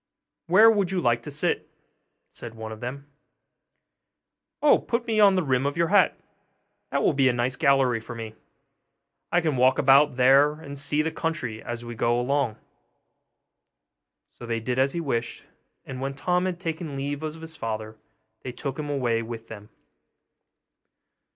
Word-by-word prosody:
'Where 215 +6 +7
would 200 -5 0
you 190 -1 -1
like 120 -6 +1
to 135 - -8
sit?' 145 0 -2 0.6
said 115 -1 -10
one 110 0 -7
of 110 - -8
them. 135 +4 -6 1.5
'Oh, 300 - +5
put 235 0 -2
me 225 -2 0
on 200 -2 +6
the 185 - +1
rim 130 -1 +1
of 145 - -3
your 170 -1 +1
hat; 200 -1 +4 0.7
that - - -1
will - - +3
be 135 -1 +3
a - - +1
nice 120 +2 -1
gallery 135 -5 +2
for 115 +1 -9
me; 110 -1 -7 1.0
I 175 - +3
can 155 -5 -1
walk 130 +1 +4
about 140 0 +5
there 135 +3 +5
and 150 -2 -10
see 145 +2 0
the 160 - -2
country 125 -11 -3
as 120 0 -6
we 120 - -6
go 120 +1 +1
along.' 125 -3 0 1.7
So 120 - -11
they 115 -1 -1
did 125 +3 -2
as 135 +1 +2
he 170 - -2
wished; 120 -6 -3 0.4
and 130 -1 -7
when 135 0 -3
Tom 180 +5 0
had 180 -2 -3
taken 160 -4 -5
leave 140 +1 -4
of 155 0 -5
his 160 0 -7
father 110 -5 -5 0.5
they 125 - -6
took 135 +2 -5
him 150 -1 -4
away 120 -5 0
with 115 0 -8
them. 105 -1 -10
135 Hz, 170 wpm, -25 LUFS, 120-160 Hz, 1.7 s, Where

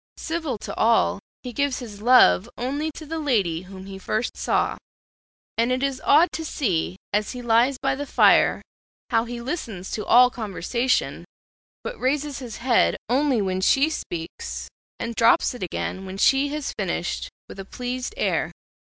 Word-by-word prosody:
Civil 320 -7 -3
to - - -7
all, 225 -3 +3 0.2
he 250 - -6
gives 280 0 0
his 210 -5 -9
love 210 - +6
only 280 +6 -2
to 315 - -8
the 325 +2 -4
lady 200 - +1
whom 190 0 -11
he 195 0 -8
first 215 +4 -2
saw; - - 0 0.8
and 235 +2 +2
it 255 +1 0
is 275 -2 -1
odd 320 +5 +5
to 320 - -4
see, 190 - -1 0.2
as 210 +2 0
he 250 - -6
lies 240 +3 +3
by 270 +1 0
the 285 +2 -5
fire, - - +4 0.5
how 225 0 +2
he 240 0 -6
listens 235 - -5
to 210 - -3
all 250 +1 +6
conversation, 235 +3 -1 0.6
but - - -6
raises 285 +2 -1
his 245 -4 -7
head 240 -1 +3
only 260 -3 +2
when 185 -1 -1
she 275 +10 +3
speaks, 170 - -5 0.3
and 235 0 -3
drops 230 +2 +4
it 245 - -10
again 190 +1 -4
when 190 +1 -7
she 270 +7 +4
has 295 0 -4
finished, - - -2 0.2
with - - -11
a - - -4
pleased 250 - -5
air. - - 0
245 Hz, 170 wpm, -24 LUFS, 205-275 Hz, 0.8 s, love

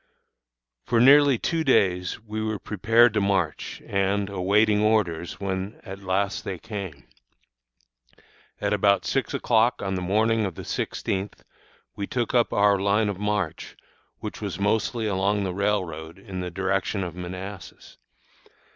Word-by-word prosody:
For 115 - +1
nearly 140 +1 +7
two 165 +6 -1
days 90 - +2
we 110 0 -5
were 110 -1 -2
prepared 115 +4 +3
to 105 - +1
march, 95 -6 -1
and 100 0 0
awaiting 105 +3 +2
orders, 100 -6 0
when 95 +1 -4
at 95 -3 -8
last 100 +1 -1
they 95 - -4
came. 95 -9 -7 1.5
At - - 0
about 100 -1 +3
six 135 -2 -1
o'clock 115 0 +2
on 95 -1 -2
the 95 - -2
morning 110 +4 +2
of 95 -5 -3
the - - -8
sixteenth 95 +1 -3 0.5
we 100 - -4
took 120 -3 -2
up 120 -2 +3
our 100 -1 +3
line 100 +2 +2
of 100 -2 -4
march, 105 -5 -2 0.4
which - - -6
was - - -4
mostly 110 +3 0
along 100 0 +1
the 95 -2 -2
railroad 90 -5 -2
in 95 -2 -7
the 90 0 -3
direction 95 +2 -1
of 90 -3 -5
Manassas. 90 +1 -8
100 Hz, 145 wpm, -25 LUFS, 95-110 Hz, 1.5 s, nearly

